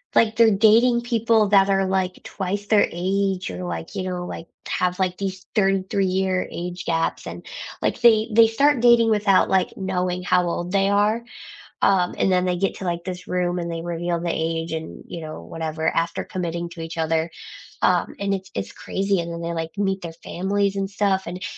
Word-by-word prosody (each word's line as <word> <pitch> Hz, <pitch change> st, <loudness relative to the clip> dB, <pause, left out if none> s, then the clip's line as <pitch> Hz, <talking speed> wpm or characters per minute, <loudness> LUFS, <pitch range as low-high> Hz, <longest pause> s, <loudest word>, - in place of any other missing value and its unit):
like, 225 Hz, -1 st, +4 dB
they're 230 Hz, -1 st, +6 dB
dating 225 Hz, +4 st, +5 dB
people 230 Hz, -3 st, +2 dB
that 195 Hz, -1 st, +5 dB
are, 195 Hz, 0 st, +2 dB
like, 190 Hz, -1 st, -1 dB
twice 200 Hz, +1 st, -4 dB
their 210 Hz, -2 st, +4 dB
age 190 Hz, -, -1 dB
or, 90 Hz, 0 st, -6 dB
like, 85 Hz, -2 st, -5 dB
you 185 Hz, -, -3 dB
know, 180 Hz, -1 st, -3 dB
like, 165 Hz, -, -7 dB, 0.2 s
have, 180 Hz, 0 st, 0 dB
like, 185 Hz, -1 st, 0 dB
these 190 Hz, -1 st, -4 dB
33 195 Hz, -1 st, +1 dB
year 185 Hz, 0 st, 0 dB
age 175 Hz, +1 st, -6 dB
gaps, 165 Hz, 0 st, -1 dB
and, -, -, -8 dB, 0.4 s
like, -, -, -1 dB
they 225 Hz, -1 st, +5 dB
they 225 Hz, +1 st, +7 dB
start 280 Hz, +5 st, +3 dB
dating 235 Hz, -1 st, +5 dB
without, 205 Hz, -3 st, +3 dB
like, 190 Hz, -2 st, +2 dB
knowing 180 Hz, -1 st, -2 dB
how 180 Hz, -1 st, +2 dB
old 175 Hz, +1 st, -3 dB
they 195 Hz, 0 st, +2 dB
are, 210 Hz, +3 st, +2 dB, 0.6 s
um, 180 Hz, -2 st, +3 dB
and 190 Hz, -, +2 dB
then 180 Hz, 0 st, +2 dB
they 180 Hz, -, +1 dB
get 195 Hz, +2 st, 0 dB
to, 190 Hz, -, -7 dB
like, 170 Hz, -1 st, -2 dB
this 185 Hz, 0 st, -6 dB
room 180 Hz, -1 st, 0 dB
and 170 Hz, 0 st, -3 dB
they 165 Hz, 0 st, -4 dB
reveal 170 Hz, 0 st, -2 dB
the 170 Hz, -, -2 dB
age, 165 Hz, 0 st, -2 dB
and, 160 Hz, 0 st, -6 dB
you 170 Hz, -, -7 dB
know, 155 Hz, -1 st, -7 dB
whatever 160 Hz, 0 st, -2 dB
after 165 Hz, 0 st, -1 dB
committing 170 Hz, -1 st, -4 dB
to 170 Hz, -1 st, -9 dB
each 165 Hz, +1 st, -6 dB
other, 160 Hz, 0 st, 0 dB, 0.5 s
um, -, -, +2 dB
and 200 Hz, 0 st, 0 dB
it's 190 Hz, -1 st, -5 dB
it's 100 Hz, 0 st, -4 dB
crazy, 195 Hz, 0 st, -1 dB
and 170 Hz, 0 st, -4 dB
then 170 Hz, -, -6 dB
they, 170 Hz, 0 st, -3 dB
like, 165 Hz, -1 st, -3 dB
meet 195 Hz, -1 st, 0 dB
their 170 Hz, -1 st, -6 dB
families 200 Hz, +2 st, -1 dB
and 195 Hz, 0 st, -2 dB
stuff 195 Hz, -1 st, +1 dB
and 180 Hz, +2 st, -6 dB
185 Hz, 205 wpm, -23 LUFS, 170-200 Hz, 0.6 s, they